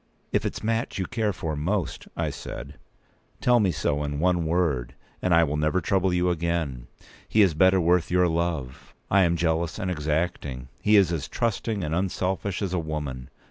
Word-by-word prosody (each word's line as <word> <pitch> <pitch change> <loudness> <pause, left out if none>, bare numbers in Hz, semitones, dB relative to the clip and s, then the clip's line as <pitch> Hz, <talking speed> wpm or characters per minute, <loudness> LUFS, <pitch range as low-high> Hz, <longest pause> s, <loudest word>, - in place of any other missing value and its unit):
"If - - +1
it's - - -6
Mat 115 +3 -1
whom 95 - -1
you - - -3
care 110 -2 0
for 80 -4 -4
most," 90 +4 -2
I - - -1
said, - - -8 0.6
"tell 125 -1 +4
me 100 -4 +3
so 75 -2 -1
in 70 0 -3
one 85 -1 +2
word, 80 -8 0 0.3
and 90 - 0
I 85 0 +6
will 75 -1 -1
never 75 +4 +1
trouble 95 +2 +1
you 90 0 +2
again. 80 -7 -2 0.4
He 110 - +5
is 95 -5 +3
better 95 +4 +4
worth 85 0 +2
your 90 0 +3
love. 80 -6 -3 0.2
I 100 - +5
am 85 -2 +3
jealous 80 0 0
and 95 -4 -2
exacting; 75 -5 -2
he 105 - +4
is 95 -4 +5
as 80 -4 -2
trusting 110 -3 -1
and 75 -1 -2
unselfish 95 +2 -1
as 95 -2 -2
a 90 - +1
woman. 75 -6 -4
85 Hz, 190 wpm, -26 LUFS, 75-95 Hz, 0.6 s, I